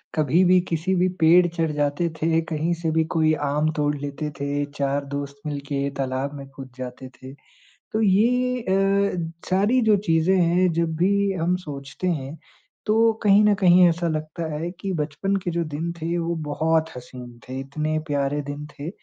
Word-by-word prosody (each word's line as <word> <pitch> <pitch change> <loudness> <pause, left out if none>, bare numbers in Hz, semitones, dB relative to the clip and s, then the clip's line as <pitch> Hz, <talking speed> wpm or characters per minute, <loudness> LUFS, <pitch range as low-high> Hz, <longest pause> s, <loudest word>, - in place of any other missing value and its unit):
कभी 155 +4 +3
भी 180 +1 +5
किसी 170 +3 0
भी 180 +1 +3
पेड़ 170 +2 +6
चढ़ 165 -2 -1
जाते 145 +3 0
थे, 165 +1 +2
कहीं 165 +1 -2
से 160 - 0
भी 160 0 +2
कोई 155 -1 +3
आम 150 +1 0
तोड़ 150 -1 0
लेते 145 +2 -4
थे, 145 +1 -1
4 140 0 -2
दोस्त 140 0 -5
मिलके 140 -1 -3
तालाब 135 +1 -2
में 140 -1 -9
कूद 135 -1 -9
जाते 130 0 -7
थे। 130 +1 -9 0.6
तो 220 - 0
ये 250 +5 +2
अ, 195 -3 +1 0.2
सारी 205 +7 +3
जो 210 - +6
चीज़ें 165 +3 +3
हैं, 175 +1 +3
जब 165 0 0
भी 200 +3 +2
हम 180 0 0
सोचते 140 -2 -7
हैं, 150 -2 -3 0.5
तो 225 +1 +4
कहीं 205 0 +5
न 210 -1 +5
कहीं 180 -1 +6
ऐसा 170 0 0
लगता 155 +1 -4
है 165 +3 -3
कि 195 - -3
बचपन 160 +5 -1
के 175 - -1
जो 170 0 -1
दिन 160 +2 -4
थे, 165 +2 -1
वो 170 0 -1
बहुत 160 +2 +1
हसीन 125 -1 -10
थे। 130 +1 -5
इतने 155 +3 -2
प्यारे 145 0 -1
दिन 145 +1 -6
थे 145 +3 -5
160 Hz, 180 wpm, -23 LUFS, 145-180 Hz, 0.6 s, पेड़